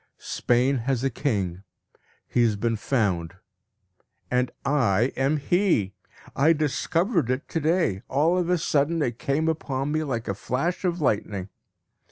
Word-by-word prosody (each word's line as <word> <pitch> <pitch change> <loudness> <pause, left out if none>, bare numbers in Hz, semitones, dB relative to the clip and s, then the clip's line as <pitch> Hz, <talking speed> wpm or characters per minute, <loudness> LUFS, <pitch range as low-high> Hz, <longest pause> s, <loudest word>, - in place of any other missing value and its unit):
Spain 125 +3 +1
has 125 +1 -1
a 135 - +1
king; 100 - -2 0.7
he 120 - +1
has 115 -3 +3
been 115 +2 0
found, 95 -8 -1 1.0
and 125 0 +2 0.2
I 120 -4 +2
am 135 +4 +1
he. 150 - +1 0.4
I 155 +4 +5
discovered 165 - 0
it 130 +2 -1
to 165 - -1
day; 160 - +1
all 155 +6 +2
of 180 -1 0
a 180 - +3
sudden 155 0 +1
it 120 -2 -3
came 150 +4 0
upon 145 -3 -1
me 155 +1 0
like 120 -6 -3
a 100 - 0
flash 135 - -2
of 175 -2 0
lightning. 105 -6 -1
135 Hz, 150 wpm, -25 LUFS, 115-160 Hz, 1.0 s, I